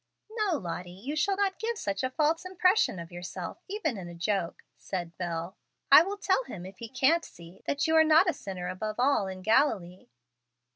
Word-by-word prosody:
"No, 425 -7 0
Lottie, 175 -2 -5
you 210 +12 -6
shall 390 +6 +1
not 395 -1 0
give 460 0 -2
such 200 - -2
a 260 - +1
false 310 +5 +1
impression 370 - +2
of 170 +1 -8
yourself, 175 - -6
even 395 - -2
in 180 - -7
a 170 - -9
joke," 185 0 -2
said 175 -3 -5
Bel. 170 +1 -4 0.3
"I - - +11
will 395 +4 -2
tell 400 +3 +1
him, 180 - -8
if 190 0 -11
he 230 - -7
can't 270 +7 +3
see, 170 +2 -13
that 285 - 0
you 320 0 +2
are 320 - +7
not 315 +4 +5
a 350 - +2
sinner 185 -3 -6
above 210 +4 -4
all 255 -5 +2
in 185 -1 -7
Galilee." 215 -7 +1
220 Hz, 200 wpm, -29 LUFS, -, 0.3 s, I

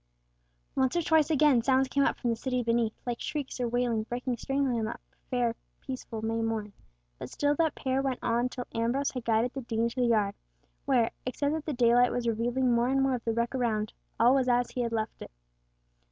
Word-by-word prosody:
Once 260 +3 +1
or 345 - +1
twice 315 -1 +3
again 295 -5 +4
sounds 265 +2 +3
came 280 +1 +1
up - - +1
from 240 - -1
the - - 0
city 250 +1 -2
beneath, 230 -1 +1
like 240 -1 -3
shrieks 285 -4 -4
or 245 - 0
wailing 240 -1 0
breaking 245 +3 -3
strangely 270 -1 0
on 220 - -1
that 225 - -5 0.3
fair 245 -3 +1 0.3
peaceful 250 -4 -6
May 225 +1 -1
morn; 220 -2 -2 0.5
but - - -6
still 290 0 +1
that 320 -3 +1
pair 265 0 0
went 270 -2 -1
on 240 +2 +1
till 250 -1 -6
Ambrose 240 +5 0
had 250 -3 -6
guided 230 +2 +2
the 270 - -4
Dean 230 -1 -1
to 250 +2 -3
the 245 - +3
yard, 210 -4 +2 0.5
where, 250 -5 +3 0.2
except 285 +3 -1
that 315 0 -4
the 305 - -1
daylight 245 0 +4
was 245 -1 -2
revealing 240 +3 +1
more 235 +1 +3
and 270 +1 +2
more 270 -1 +2
of 245 -1 -4
the 230 - +1
wreck 235 +2 -1
around, 220 -4 -1 0.3
all 240 +3 +6
was 260 -2 +2
as 245 0 +2
he 250 - -2
had 235 -1 -1
left 220 -1 -3
it. - - -7
245 Hz, 220 wpm, -29 LUFS, 230-265 Hz, 0.5 s, all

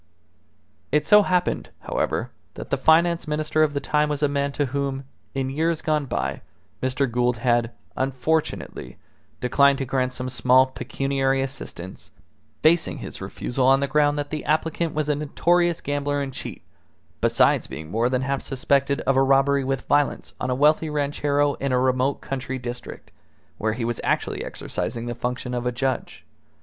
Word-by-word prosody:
It 150 +1 +2
so 210 +6 +7
happened, 180 -2 0
however, - - -2 0.2
that - - -8
the - - +4
Finance 165 +5 +3
Minister 155 +1 0
of 150 -2 +2
the - - +1
time 150 +1 +1
was 150 0 -2
a - - +5
man 140 0 -1
to 145 - 0
whom, 140 0 -2 0.3
in 135 -1 -1
years 160 +3 0
gone 150 -2 0
by, 70 - -2 0.4
Mr. 130 +2 +1
Gould 125 0 +1
had, 120 0 +2 0.3
unfortunately, 135 +4 -2 0.4
declined 140 +2 +4
to 135 - -2
grant 130 -1 0
some 125 0 -4
small 130 +1 +4
pecuniary 135 +1 -1
assistance, 95 -9 -7 0.5
basing 160 +1 +3
his - - -8
refusal 130 +1 -1
on 135 0 +6
the 140 - +1
ground 145 +1 +2
that 145 0 -3
the 155 -1 -3
applicant 160 +1 0
was 155 -1 0
a 150 - +2
notorious 170 +4 +1
gambler 145 0 -1
and 135 -1 -3
cheat, - - -7 0.6
besides - - +3
being 80 +1 -8
more 115 +3 +1
than 130 0 0
half 135 +1 -1
suspected 140 +1 +1
of 135 - +1
a 135 - +4
robbery 135 +1 +3
with 135 0 -2
violence 145 -1 +1
on 125 - -1
a 125 - +1
wealthy 150 +3 +3
ranchero 145 0 +1
in 140 -1 -1
a 125 - +3
remote 130 +2 +1
country 130 -1 -4
district, 120 -1 -8 0.5
where 110 0 0
he 115 0 -3
was 120 -1 -2
actually - - -1
exercising 115 0 -4
the 120 - -3
function 125 +1 -4
of 125 0 -2
a - - +1
judge. 130 +1 -3
135 Hz, 170 wpm, -24 LUFS, 130-150 Hz, 0.6 s, so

